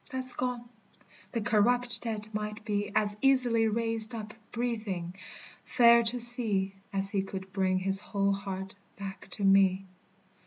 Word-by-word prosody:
That's 260 -2 -5
gone. 245 -1 -5 0.6
The 230 - -3
corrupt 240 +4 +4
dead 215 -2 -5
might 210 0 -6
be 205 -1 -3
As 210 -1 0
easily 250 -4 +2
raised 225 +1 0
up, 215 -1 -8 0.2
breathing, 215 -8 -5 0.5
fair 235 -1 +4
to 235 +2 +3
see, 225 -5 +5 0.2
As 195 0 -1
he 200 - -1
could 190 -1 -9
bring 190 -1 -1
his 195 +1 -1
whole 200 0 -2
heart 195 -1 -7 0.2
back 195 -1 -9
to 205 - -5
me. 195 -1 +2
210 Hz, 145 wpm, -28 LUFS, 195-235 Hz, 0.6 s, see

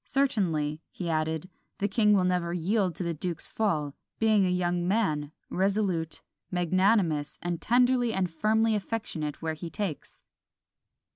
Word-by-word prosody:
Certainly," 170 - 0
he 175 -3 -4
added, 160 +1 -1 0.3
"the 205 - 0
king 210 +1 +3
will 195 -2 +4
never 180 -2 0
yield 185 0 +1
to 180 - -3
the 170 -1 -1
duke's 165 +1 -3
fall, 155 -10 -1 0.2
being 215 -3 +4
a - - +1
young 175 -1 0
man, 155 -8 0 0.2
resolute, 190 -4 0 0.3
magnanimous, 180 -3 +2
and 175 -1 -2
tenderly 245 0 +3
and 190 -3 +1
firmly 220 +6 +2
affectionate 190 -9 -3
where 160 -1 -1
he 160 +2 -6
takes." 165 -2 -5
180 Hz, 140 wpm, -28 LUFS, 160-210 Hz, 0.3 s, will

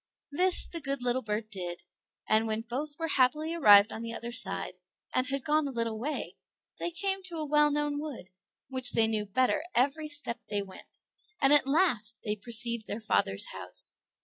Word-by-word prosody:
This 360 +5 +3
the 335 - -6
good 275 -3 -1
little 250 +1 0
bird 215 0 -4
did, 175 -3 -6 0.4
and 220 +1 +2
when 220 0 -2
both 280 +6 -6
were 330 - -3
happily 305 +3 +1
arrived 210 -10 +6
on 225 - -7
the 230 0 -5
other 235 +1 -6
side, 250 +1 +1 0.4
and 255 0 0
had 275 -1 -3
gone 305 0 +1
a - - -5
little 230 -3 -3
way, 295 +6 -5 0.4
they - - -2
came 385 +3 -2
to 345 -3 -6
a 310 - -3
well 300 0 +3
known 295 0 -1
wood, 280 -11 -8 0.4
which 255 -2 +2
they 225 - +4
knew 215 -1 -1
the 200 - -24
better 255 +6 +1
every 285 +5 +1
step 290 -5 -2
they 205 -1 -2
went, 190 -1 -15 0.4
and 275 +1 +5
at 290 -2 +5
last 250 - +1
they 210 -1 -2
perceived 235 +1 0
their 210 - -4
father's 100 - 0
house. - - +3
255 Hz, 195 wpm, -29 LUFS, 220-295 Hz, 0.4 s, arrived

